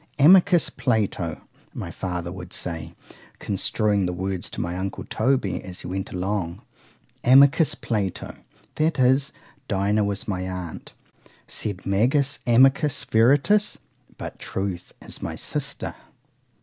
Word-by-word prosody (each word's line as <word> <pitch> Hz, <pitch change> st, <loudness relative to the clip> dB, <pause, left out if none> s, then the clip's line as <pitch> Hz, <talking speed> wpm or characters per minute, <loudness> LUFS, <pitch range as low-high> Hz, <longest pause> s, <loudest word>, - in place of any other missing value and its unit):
—Amicus 175 Hz, +3 st, +6 dB
Plato, 100 Hz, -, -1 dB, 0.3 s
my -, -, -5 dB
father 90 Hz, -2 st, -4 dB
would 90 Hz, -1 st, -8 dB
say, 85 Hz, -2 st, -5 dB, 0.4 s
construing 100 Hz, 0 st, 0 dB
the 90 Hz, -, -2 dB
words 95 Hz, 0 st, -3 dB
to -, -, -6 dB
my 85 Hz, +1 st, -2 dB
uncle 95 Hz, +2 st, -4 dB
Toby, 120 Hz, -4 st, 0 dB
as 90 Hz, -1 st, -8 dB
he -, -, -8 dB
went 95 Hz, +2 st, -4 dB
along, 90 Hz, -2 st, -3 dB, 0.6 s
Amicus 140 Hz, +5 st, +6 dB
Plato; 100 Hz, -5 st, -3 dB, 0.4 s
that 155 Hz, +2 st, +1 dB
is, 135 Hz, +3 st, +3 dB, 0.4 s
DINAH 100 Hz, +2 st, +1 dB
was 100 Hz, -1 st, -2 dB
my 95 Hz, -3 st, -2 dB
aunt;—sed 90 Hz, +2 st, -7 dB
magis 130 Hz, +8 st, +2 dB
amica 135 Hz, +5 st, +5 dB, 0.2 s
veritas—but 140 Hz, -, +1 dB
TRUTH 95 Hz, -2 st, -4 dB
is -, -, -8 dB
my -, -, -4 dB
sister. -, -, -3 dB
100 Hz, 115 wpm, -24 LUFS, 90-130 Hz, 0.6 s, Amicus